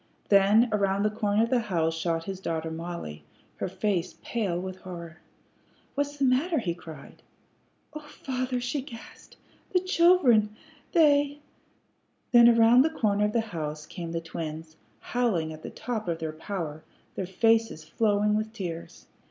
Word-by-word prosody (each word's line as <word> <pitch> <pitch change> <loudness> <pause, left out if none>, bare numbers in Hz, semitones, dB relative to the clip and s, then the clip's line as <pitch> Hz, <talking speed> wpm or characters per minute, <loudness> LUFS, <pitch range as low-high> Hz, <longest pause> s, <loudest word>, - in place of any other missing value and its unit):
Then 205 +4 +5
around 200 -1 +1
the 210 - +2
corner 210 0 +1
of 230 - -2
the 255 - +4
house 165 -8 0
shot 165 0 -1
his 190 +1 -6
daughter 160 -3 -3
Mollie, 160 - -6 0.3
her - - -2
face 185 -1 -2
pale 200 -7 -1
with 185 0 -6
horror. 170 -2 -9 0.7
"What's 285 0 -2
the 275 - +2
matter?" 285 +7 +2
he 185 - -1
cried. 160 -5 -12 0.7
"Oh, 305 - -5
father," 255 -3 -3
she 250 +3 -2
gasped, 235 -4 -13 0.4
"the 365 - +5
children! 335 - +4 0.4
They 290 -3 +4 0.5
" - - -44
Then 240 -1 +8
around 230 +1 +6
the 310 - +3
corner 210 -9 +1
of 210 - -1
the 230 - +2
house 155 -7 -5
came 170 +1 -7
the 165 - -2
twins, 160 -1 -6 0.3
howling 195 -11 0
at 155 - -11
the - - -7
top 225 -5 -4
of 170 -1 -1
their 160 -1 -4
power, 160 -2 -5 0.3
their 190 - -4
faces 225 -3 +2
flowing 210 +4 +1
with 215 +1 -2
tears. 175 -6 -7
205 Hz, 160 wpm, -27 LUFS, 170-240 Hz, 0.7 s, Then